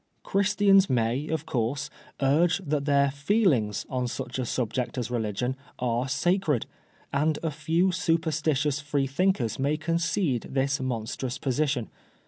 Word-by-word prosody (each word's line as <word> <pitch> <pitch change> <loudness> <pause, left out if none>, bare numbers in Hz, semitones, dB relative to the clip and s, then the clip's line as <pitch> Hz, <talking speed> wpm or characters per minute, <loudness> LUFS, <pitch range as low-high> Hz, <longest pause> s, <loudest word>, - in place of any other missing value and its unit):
" - - -44
Christians 200 -1 +4
may, 125 +4 0
of 160 0 -2
course, 135 +5 -2 0.3
urge 160 +6 +3
that 145 -1 -1
their 140 -1 +3
feelings 145 - +1
on 125 -1 -2
such 120 +1 -5
a 125 - -2
subject 125 +3 -2
as 125 -1 -3
religion 120 +2 -1 0.2
are 120 0 0
sacred^ 160 - +1 0.5
and 150 +2 +2
a 160 - 0
few 165 +5 +1
superstitious 155 -4 0
Free 145 -1 -1
thinkers 135 - 0
may 145 +3 +1
concede 165 - 0
this 135 +1 0
monstrous 125 0 -3
position. 135 -2 0
140 Hz, 135 wpm, -27 LUFS, 125-160 Hz, 0.5 s, Christians